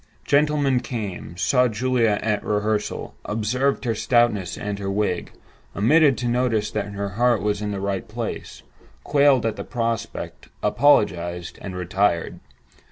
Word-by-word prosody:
Gentlemen 145 -3 +2
came; 100 -8 -6
saw 125 +8 +3
Julia 115 -1 +1
at 105 -1 0
rehearsal; 105 0 -1
observed 125 +6 -1
her 115 - +1
stoutness 110 -5 +1
and 100 -1 -4
her 100 -1 -3
wig; 100 -3 -1 0.4
omitted 140 +5 +4
to 120 +2 -2
notice 120 -3 +1
that 100 -1 -3
her 100 0 -3
heart 120 +3 +2
was 105 0 0
in 105 - -2
the 100 -1 -3
right 100 -1 -3
place; 115 +1 -6 0.4
quailed 140 -4 +4
at 110 - -1
the - - -4
prospect, 115 -2 -4
apologized, 90 -10 +2
and 95 -2 -6
retired. 90 -1 0
110 Hz, 140 wpm, -23 LUFS, 100-125 Hz, 0.4 s, omitted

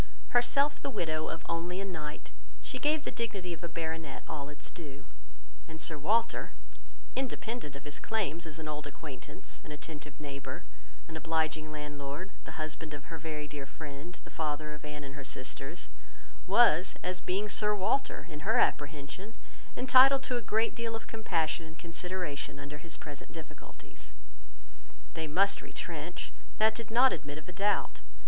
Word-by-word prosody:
Herself 280 +4 +4
the - - -1
widow 155 -9 0
of 165 - -3
only 170 +2 0
a 195 - -1
knight, 155 -5 -5 0.3
she 260 - -2
gave 300 +2 +3
the - - -2
dignity 200 -7 -2
of 170 +1 -9
a 170 - -2
baronet 160 -3 -3
all 145 -3 -3
its 150 - -7
due; 145 -4 -8 0.6
and 160 0 -8
Sir 160 - +2
Walter, 215 +10 +2 0.6
independent 240 - -2
of 140 - -7
his 145 0 -4
claims 175 -7 0
as 155 -1 -6
an 160 -1 -5
old 150 -1 -3
acquaintance, 145 -1 -8
an - - -8
attentive 150 0 -7
neighbour, 140 -2 -5 0.4
an 160 -1 -4
obliging 160 -1 +1
landlord, 150 +3 -4
the - - -6
husband 155 -1 -3
of 145 +3 -8
her 165 - -3
very 150 -1 -3
dear 145 -2 -5
friend, 145 +4 -7
the - - -11
father 150 -1 -1
of 150 - -9
Anne 150 -1 -5
and 135 -1 -7
her 145 -1 -6
sisters, 135 +4 -4 0.6
was, 190 -7 +7
as 180 0 0
being 195 +3 +1
Sir 210 0 +5
Walter, 220 +8 +2
in 150 -3 -6
her 150 - +3
apprehension, 145 +9 +1 0.4
entitled 265 +1 +8
to 250 - +1
a 240 - +1
great 220 +1 +3
deal 230 -1 -1
of 225 - -5
compassion 170 -7 +1
and 160 0 -11
consideration 165 -6 -2
under 145 +1 -6
his 165 +2 -3
present 145 -3 -7
difficulties. 160 -2 -10 1.0
They 160 -1 -2
must 195 +6 +4
retrench; 155 +4 -4 0.2
that 220 0 +6
did 230 -1 -5
not 245 +4 +7
admit 145 +1 -4
of 155 - -9
a - - -5
doubt. 205 +2 +2
160 Hz, 170 wpm, -33 LUFS, 150-200 Hz, 1.0 s, entitled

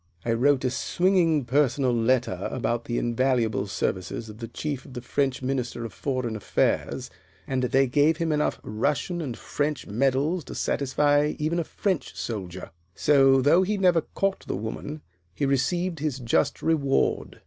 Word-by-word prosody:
"I 115 - +1
wrote 130 +3 +2
a 125 - +1
swinging 165 0 +2
personal 135 -1 +2
letter 115 -5 +1
about 120 -2 -1
the 120 - -2
invaluable 120 -4 +1
services 95 +3 -3
of 105 +1 -11
the 115 - -5
Chief 140 +3 -4
to - - -16
the 125 -2 -6
French 135 +1 -1
Minister 125 -3 -2
of 115 - -7
Foreign 130 -5 -2
Affairs, 110 - -1 0.3
and 130 -1 -1
they 135 +2 +3
gave 145 +5 +3
him 165 -2 0
enough 150 0 0
Russian 145 - -1
and 130 -7 -4
French 150 0 -2
medals 135 - +1
to - - -8
satisfy 145 +2 +1
even 160 +3 0
a - - 0
French 185 0 -2
soldier. 95 -5 -5 0.2
So, 135 -2 +4
though 160 +6 +5
he 205 +3 0
never 180 -4 +4
caught 195 0 0
the - - -2
woman, 130 +8 -6 0.3
he 145 - 0
received 165 +6 0
his 150 -3 -2
just 120 -3 0
reward." 145 -4 +1
135 Hz, 160 wpm, -26 LUFS, 120-150 Hz, 0.3 s, though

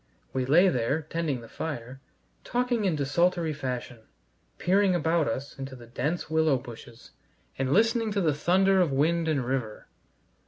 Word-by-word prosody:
We 130 -1 -1
lay 170 +7 +6
there, 140 +1 0
tending 155 -5 -2
the 115 - -11
fire, 130 -1 -6 0.4
talking 245 -3 0
in 180 -4 +1
desultory 165 +3 +1
fashion, 125 -4 -5 0.6
peering 190 0 +3
about 165 -1 +1
us 135 +4 -4
into 135 0 -6
the 120 -2 -12
dense 140 +8 -3
willow 160 -3 +2
bushes, 120 -1 -12 0.5
and 135 -1 0
listening 225 +3 +2
to 200 - 0
the 160 -4 +2
thunder 190 +5 +3
of 170 -5 +1
wind 160 +5 +1
and 140 -6 0
river. 125 -4 -3
155 Hz, 155 wpm, -27 LUFS, 130-175 Hz, 0.6 s, lay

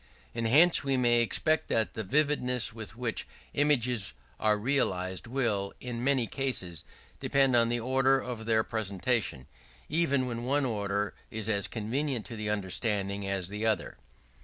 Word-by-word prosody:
And 115 -1 -1
hence 160 +9 +5
we 135 -1 +1
may 120 -1 +4
expect 155 +6 +2
that 110 -5 0
the 110 - -4
vividness 125 -2 +1
with 110 -1 -7
which 120 -1 -3 0.3
images 125 - +2 0.3
are 105 -1 +2
realized 95 -6 -1
will, 115 -6 -1
in 120 -1 -5
many 135 -3 +2
cases, 110 - -2 0.4
depend 135 -2 +2
on 115 -1 +4
the 120 0 0
order 130 +2 +2
of 120 -3 -6
their 110 -1 +3
presentation: 105 - -1 0.4
even 145 -4 +1
when 120 -1 -4
one 140 +3 +1
order 100 -3 -1 0.2
is 110 -1 -3
as 100 -2 +1
convenient 125 +3 -2
to 115 - -7
the 105 -1 -3
understanding 100 0 -2
as 95 -2 0
the 105 +2 -5
other. 110 - -1
115 Hz, 155 wpm, -29 LUFS, 105-130 Hz, 0.4 s, hence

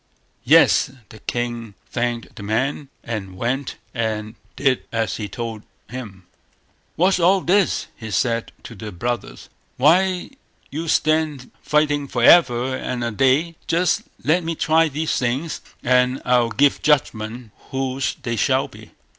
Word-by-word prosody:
Yes! - - +5 0.2
the 110 - -13
king 120 -2 -4 0.2
thanked 120 -1 -2
the - - -9
man, 130 +7 -1
and 100 -5 -5
went 130 +5 -2 0.2
and 110 -2 -2 0.2
did 135 -3 +1
as 115 -3 -1
he 105 -2 -5
told 115 +1 -5 0.3
him. 105 -8 -8 0.7
"What's 185 +2 +3
all 185 +3 +5
this?" 190 -1 +2
he 110 -2 -8
said 115 +3 0
to - - -9
the 105 0 -7
brothers. 120 +6 -4 0.3
"Why 180 +6 +3
do - - -24 0.4
you 160 +4 -4
stand 155 -2 +1
here 125 - -17
fighting 150 -1 +1
for 120 - -2
ever 130 -5 +5
and 125 -2 -3
a 120 - -1
day? 135 +9 +2
Just 170 +1 +2 0.2
let 170 +4 +2
me 165 0 -2
try 160 +1 +3
these 155 +2 -2
things, 130 +6 -2 0.2
and 125 +1 +3
I'll 125 -2 +3
give 140 +4 +2
judgment 120 -5 0 0.2
whose 135 0 -2
they 120 -3 -2
shall - - +2
be." - - -15
125 Hz, 145 wpm, -21 LUFS, 115-150 Hz, 0.7 s, Yes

